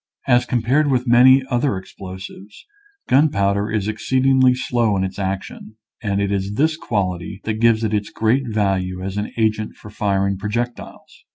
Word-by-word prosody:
As 120 Hz, -2 st, +3 dB
compared 125 Hz, +5 st, +1 dB
with 125 Hz, -2 st, +1 dB
many 130 Hz, +2 st, +6 dB
other 120 Hz, -3 st, +1 dB
explosives, 95 Hz, +2 st, -10 dB, 0.4 s
gunpowder 100 Hz, -7 st, +2 dB
is 105 Hz, -2 st, -1 dB
exceedingly 130 Hz, +3 st, +2 dB
slow 120 Hz, -5 st, 0 dB
in 95 Hz, -, 0 dB
its 95 Hz, +1 st, -5 dB
action, 95 Hz, +2 st, -5 dB, 0.3 s
and 100 Hz, -3 st, -1 dB
it 100 Hz, 0 st, -1 dB
is 100 Hz, +1 st, -2 dB
this 155 Hz, +5 st, +2 dB
quality 100 Hz, -, -3 dB
that 110 Hz, 0 st, -3 dB
gives 115 Hz, -1 st, +3 dB
it 110 Hz, -1 st, -1 dB
its 105 Hz, -1 st, -1 dB
great 120 Hz, +4 st, 0 dB
value 95 Hz, -4 st, -1 dB
as 95 Hz, +1 st, -4 dB
an 105 Hz, -, -3 dB
agent 110 Hz, -1 st, 0 dB
for 105 Hz, -, -13 dB
firing 100 Hz, -2 st, -1 dB
projectiles. 120 Hz, +4 st, -5 dB
110 Hz, 160 wpm, -20 LUFS, 100-120 Hz, 0.4 s, many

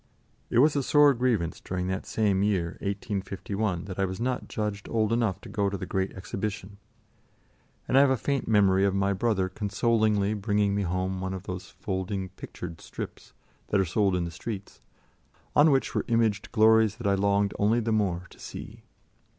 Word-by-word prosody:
It -, -, 0 dB
was 145 Hz, +5 st, +5 dB
a 140 Hz, -, +2 dB
sore 145 Hz, +1 st, +5 dB
grievance 115 Hz, -9 st, 0 dB
during 90 Hz, -1 st, -3 dB
that 95 Hz, 0 st, -3 dB
same 100 Hz, -3 st, +1 dB
year, 95 Hz, -5 st, +1 dB
1851, 100 Hz, -1 st, -3 dB
that 95 Hz, -1 st, -7 dB
I 95 Hz, -, +3 dB
was 95 Hz, +1 st, -5 dB
not 125 Hz, +1 st, -2 dB
judged 105 Hz, -2 st, -4 dB
old 110 Hz, -1 st, +1 dB
enough 115 Hz, -6 st, +1 dB
to -, -, -11 dB
go 100 Hz, -1 st, 0 dB
to 100 Hz, -, -3 dB
the -, -, -5 dB
Great 95 Hz, 0 st, -1 dB
Exhibition, 100 Hz, +1 st, -5 dB, 1.1 s
and -, -, 0 dB
I 135 Hz, -, +8 dB
have 140 Hz, -, +5 dB
a 130 Hz, -, +2 dB
faint 140 Hz, +4 st, -1 dB
memory 100 Hz, -3 st, +4 dB
of 100 Hz, -1 st, +2 dB
my 100 Hz, 0 st, +2 dB
brother 100 Hz, -2 st, +1 dB
consolingly 105 Hz, +1 st, +1 dB
bringing 105 Hz, -1 st, +1 dB
me 100 Hz, -, 0 dB
home 95 Hz, +1 st, -2 dB
one 95 Hz, 0 st, -3 dB
of 95 Hz, -, -7 dB
those 90 Hz, -1 st, -6 dB
folding 95 Hz, 0 st, -4 dB
pictured 85 Hz, -2 st, -9 dB
strips -, -, -8 dB, 0.3 s
that 100 Hz, -, +2 dB
are 95 Hz, -, +3 dB
sold 95 Hz, +2 st, +1 dB
in 90 Hz, -1 st, 0 dB
the 85 Hz, -, -5 dB
streets, 100 Hz, +3 st, -7 dB, 0.7 s
on 150 Hz, +2 st, +7 dB
which 135 Hz, -2 st, +1 dB
were -, -, 0 dB
imaged 115 Hz, -4 st, +1 dB
glories 110 Hz, -2 st, +5 dB
that 120 Hz, -, -8 dB
I 100 Hz, -, +3 dB
longed 100 Hz, +1 st, +2 dB
only 110 Hz, +4 st, +3 dB
the 115 Hz, -1 st, -1 dB
more 95 Hz, -5 st, 0 dB
to -, -, -17 dB
see. -, -, -9 dB
100 Hz, 190 wpm, -27 LUFS, 95-110 Hz, 1.1 s, I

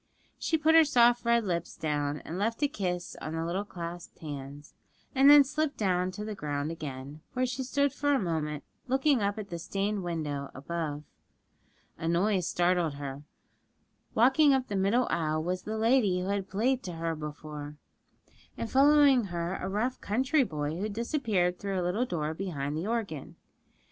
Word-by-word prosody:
She 320 Hz, -, +1 dB
put 315 Hz, +1 st, +3 dB
her 325 Hz, 0 st, +8 dB
soft 240 Hz, -4 st, +4 dB
red 235 Hz, -1 st, +3 dB
lips 170 Hz, -3 st, -3 dB
down 145 Hz, -1 st, -1 dB
and 170 Hz, +3 st, -5 dB
left 230 Hz, +7 st, -1 dB
a -, -, +5 dB
kiss 180 Hz, -8 st, -3 dB
on 155 Hz, -, -4 dB
the 165 Hz, 0 st, -2 dB
little 180 Hz, +4 st, -1 dB
clasped 175 Hz, -3 st, -8 dB
hands, 145 Hz, -1 st, -8 dB, 0.4 s
and 275 Hz, 0 st, +6 dB
then 290 Hz, -1 st, +10 dB
slipped 300 Hz, +2 st, -2 dB
down 185 Hz, -3 st, +1 dB
to 210 Hz, +2 st, -5 dB
the 215 Hz, -, -4 dB
ground 145 Hz, -4 st, -3 dB
again, 145 Hz, -1 st, -7 dB
where 255 Hz, 0 st, +1 dB
she 255 Hz, +1 st, -3 dB
stood 280 Hz, +1 st, +1 dB
for 290 Hz, 0 st, 0 dB
a 275 Hz, -, +3 dB
moment 155 Hz, -5 st, -2 dB, 0.2 s
looking 265 Hz, 0 st, +2 dB
up 200 Hz, +1 st, 0 dB
at 205 Hz, -3 st, -7 dB
the 170 Hz, -, -4 dB
stained 200 Hz, +4 st, -2 dB
window 150 Hz, -5 st, -3 dB
above. 150 Hz, +1 st, -4 dB, 1.0 s
A 165 Hz, -, -3 dB
noise 180 Hz, +2 st, +2 dB
startled 175 Hz, -4 st, +1 dB
her: 140 Hz, -1 st, -6 dB, 0.9 s
walking 270 Hz, +5 st, +5 dB
up 260 Hz, -1 st, -2 dB
the 205 Hz, -, -2 dB
middle 200 Hz, +6 st, +2 dB
aisle 155 Hz, -1 st, 0 dB
was 180 Hz, +2 st, -2 dB
the 220 Hz, +1 st, -4 dB
lady 220 Hz, -5 st, +3 dB
who 185 Hz, +2 st, -3 dB
had 200 Hz, -1 st, -2 dB
played 245 Hz, +6 st, +1 dB
to 180 Hz, -, -6 dB
her 165 Hz, 0 st, -2 dB
before, 150 Hz, -1 st, -7 dB, 0.8 s
and 230 Hz, -, -4 dB
following 280 Hz, -3 st, +6 dB
her 175 Hz, -1 st, -3 dB
a 185 Hz, -, -4 dB
rough 225 Hz, +6 st, -1 dB
country 260 Hz, +7 st, +2 dB
boy, 150 Hz, -4 st, -3 dB
who 210 Hz, +3 st, -2 dB
disappeared 215 Hz, -, 0 dB
through 195 Hz, -2 st, -2 dB
a -, -, -1 dB
little 210 Hz, +8 st, 0 dB
door 155 Hz, -4 st, -2 dB
behind 150 Hz, -5 st, -3 dB
the 165 Hz, +6 st, -3 dB
organ. 220 Hz, -, -3 dB
190 Hz, 180 wpm, -29 LUFS, 160-240 Hz, 1.0 s, then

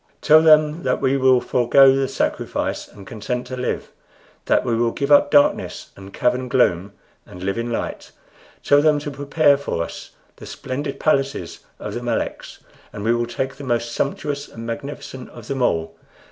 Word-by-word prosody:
Tell 155 Hz, 0 st, +6 dB
them 155 Hz, 0 st, +4 dB
that 125 Hz, -4 st, 0 dB
we 135 Hz, 0 st, +1 dB
will 130 Hz, -1 st, +4 dB
forego 135 Hz, +3 st, +4 dB
the 135 Hz, 0 st, 0 dB
sacrifice 135 Hz, -, -2 dB
and 100 Hz, -2 st, -14 dB
consent 120 Hz, +4 st, -4 dB
to 130 Hz, +1 st, -6 dB
live; 125 Hz, 0 st, -3 dB, 0.5 s
that -, -, +2 dB
we 120 Hz, -2 st, 0 dB
will 115 Hz, +1 st, +1 dB
give 140 Hz, +4 st, -3 dB
up 145 Hz, 0 st, +6 dB
darkness 145 Hz, -1 st, +2 dB
and 100 Hz, 0 st, -12 dB
cavern 125 Hz, +3 st, 0 dB
gloom 100 Hz, -7 st, +1 dB, 0.3 s
and 90 Hz, 0 st, -12 dB
live 100 Hz, +4 st, -2 dB
in 120 Hz, 0 st, -3 dB
light. -, -, -5 dB, 0.5 s
Tell 145 Hz, 0 st, +4 dB
them 155 Hz, -1 st, +3 dB
to 145 Hz, 0 st, -5 dB
prepare 145 Hz, +1 st, +2 dB
for 140 Hz, -12 st, -3 dB
us -, -, -9 dB, 0.3 s
the -, -, -11 dB
splendid 140 Hz, +2 st, -5 dB
palaces 135 Hz, -, -1 dB, 0.2 s
of -, -, -7 dB
the -, -, -4 dB
Meleks, -, -, -4 dB, 0.3 s
for 105 Hz, -, -9 dB
we 115 Hz, +3 st, +2 dB
will 120 Hz, 0 st, -1 dB
take 130 Hz, +3 st, -4 dB
the 145 Hz, -, -9 dB
most 120 Hz, -2 st, -1 dB
sumptuous 140 Hz, +3 st, -3 dB
and 115 Hz, 0 st, -10 dB
magnificent 130 Hz, +1 st, -7 dB
of 120 Hz, -2 st, -13 dB
them 135 Hz, -1 st, -3 dB
all. 80 Hz, -8 st, 0 dB
130 Hz, 180 wpm, -21 LUFS, 115-140 Hz, 0.5 s, Tell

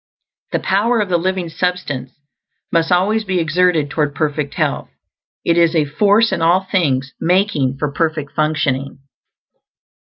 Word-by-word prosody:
The -, -, +1 dB
power 225 Hz, +5 st, +1 dB
of 205 Hz, -3 st, -1 dB
the 175 Hz, -1 st, +2 dB
living 185 Hz, 0 st, -1 dB
substance 160 Hz, -7 st, -3 dB, 0.6 s
must 165 Hz, +1 st, +1 dB
always 205 Hz, +5 st, +2 dB
be 190 Hz, -3 st, -1 dB
exerted 165 Hz, -2 st, +1 dB
toward 150 Hz, -2 st, -1 dB
perfect 150 Hz, -1 st, -2 dB
health; -, -, -1 dB, 0.6 s
it 170 Hz, 0 st, +3 dB
is 170 Hz, 0 st, +3 dB
a 155 Hz, -2 st, +3 dB
force 205 Hz, +9 st, +3 dB
in -, -, -1 dB
all 170 Hz, +3 st, +4 dB
things 140 Hz, -8 st, 0 dB
making 170 Hz, -8 st, +1 dB
for 150 Hz, 0 st, -2 dB
perfect 155 Hz, -2 st, -2 dB
functioning. 150 Hz, -3 st, -1 dB
165 Hz, 145 wpm, -18 LUFS, 150-185 Hz, 0.6 s, all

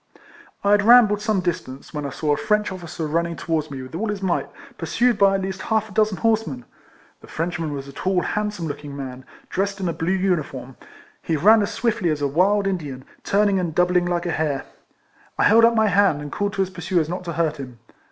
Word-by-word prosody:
I 200 Hz, -, +3 dB
had 205 Hz, 0 st, +5 dB
rambled 215 Hz, -2 st, +6 dB
some 210 Hz, -3 st, 0 dB
distance, 170 Hz, -7 st, -5 dB
when 150 Hz, -2 st, -3 dB
I -, -, -4 dB
saw 150 Hz, +2 st, -1 dB
a -, -, +2 dB
French 210 Hz, 0 st, 0 dB
officer 170 Hz, -3 st, -6 dB
running 170 Hz, +2 st, -1 dB
towards 155 Hz, 0 st, -2 dB
me 135 Hz, -2 st, -6 dB
with 130 Hz, -, -11 dB
all 205 Hz, +7 st, -2 dB
his 205 Hz, -2 st, -4 dB
might, 180 Hz, -2 st, 0 dB, 0.3 s
pursued 230 Hz, +9 st, +1 dB
by 195 Hz, -1 st, +4 dB
at 195 Hz, -, -1 dB
least 190 Hz, 0 st, -4 dB
half 220 Hz, +1 st, 0 dB
a -, -, -13 dB
dozen 215 Hz, -1 st, +1 dB
horsemen. 220 Hz, -, 0 dB, 0.5 s
The -, -, -16 dB
Frenchman 165 Hz, -1 st, -3 dB
was 140 Hz, -1 st, -6 dB
a 140 Hz, -, -11 dB
tall, 185 Hz, +2 st, 0 dB
handsome 210 Hz, -4 st, -2 dB
looking 145 Hz, -1 st, -7 dB
man, 130 Hz, -1 st, -7 dB, 0.2 s
dressed 200 Hz, +1 st, -2 dB
in 185 Hz, -, -2 dB
a 170 Hz, -, -1 dB
blue 165 Hz, +2 st, -2 dB
uniform; 155 Hz, -9 st, -1 dB, 0.5 s
he 160 Hz, -, -1 dB
ran 215 Hz, +8 st, +6 dB
as 205 Hz, -, -1 dB
swiftly 225 Hz, -5 st, 0 dB
as 150 Hz, -2 st, -1 dB
a -, -, +3 dB
wild 195 Hz, +8 st, +2 dB
In 195 Hz, -1 st, +1 dB
dian, 135 Hz, -5 st, -8 dB, 0.2 s
turning 200 Hz, -1 st, +2 dB
and 170 Hz, -4 st, -3 dB
doubling 180 Hz, 0 st, +2 dB
like 175 Hz, 0 st, -1 dB
a 175 Hz, -, -1 dB
hare. 150 Hz, -4 st, -1 dB, 0.7 s
I -, -, +2 dB
held 225 Hz, +2 st, +6 dB
up 230 Hz, 0 st, +5 dB
my 220 Hz, -1 st, +3 dB
hand, 200 Hz, -7 st, +3 dB
and 145 Hz, -1 st, -7 dB
called 205 Hz, 0 st, -2 dB
to 195 Hz, -, -1 dB
his 190 Hz, -, -6 dB
pursuers 175 Hz, -2 st, -1 dB
not 180 Hz, +2 st, -4 dB
to 170 Hz, -, -4 dB
hurt 155 Hz, -2 st, 0 dB
him. 130 Hz, -3 st, -8 dB
180 Hz, 225 wpm, -22 LUFS, 155-205 Hz, 0.7 s, rambled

